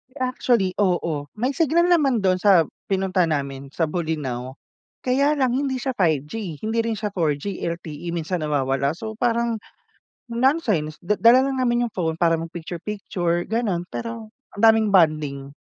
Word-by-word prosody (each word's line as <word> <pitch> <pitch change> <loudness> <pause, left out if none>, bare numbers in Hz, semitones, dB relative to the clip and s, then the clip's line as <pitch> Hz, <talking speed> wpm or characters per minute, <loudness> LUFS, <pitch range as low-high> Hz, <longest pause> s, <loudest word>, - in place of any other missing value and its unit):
Actually, 250 -6 +1
oo. 170 -7 0
May 245 +5 0
signal 335 +4 +2
naman 275 - +3
dun 185 -1 +2
sa 185 -3 +5 0.2
pinunta 190 -2 +1
namin 140 -3 -3
sa 165 - +1
Bolinao 150 -6 -3 0.5
kaya, 280 +4 +3
lang 255 -2 +2
hindi 265 -1 -1
siya 260 0 -3
5G, 160 - -1
hindi 225 +1 -1
rin 230 -1 -1
siya 210 0 -3
4G 160 +3 -1
LTE 170 -1 -5
minsan 170 0 -2
nawawala. 140 -2 0
So, 220 +4 -6
parang 235 0 +1 0.8
nonsense 230 - +1
da 180 +4 +1
dala 240 +3 +6
lang 270 -1 -2
namin 240 -1 +2
yung 225 - -10
phone 165 -3 -1
para 165 -1 +4
mag 165 0 -6
picture 170 0 -6
picture 175 -4 -2
gano'n 205 -6 -1
pero 230 -1 -6 0.2
ang 205 - -9
daming 220 -2 +5
bonding. 150 -6 +2
190 Hz, 155 wpm, -23 LUFS, 160-235 Hz, 0.8 s, dala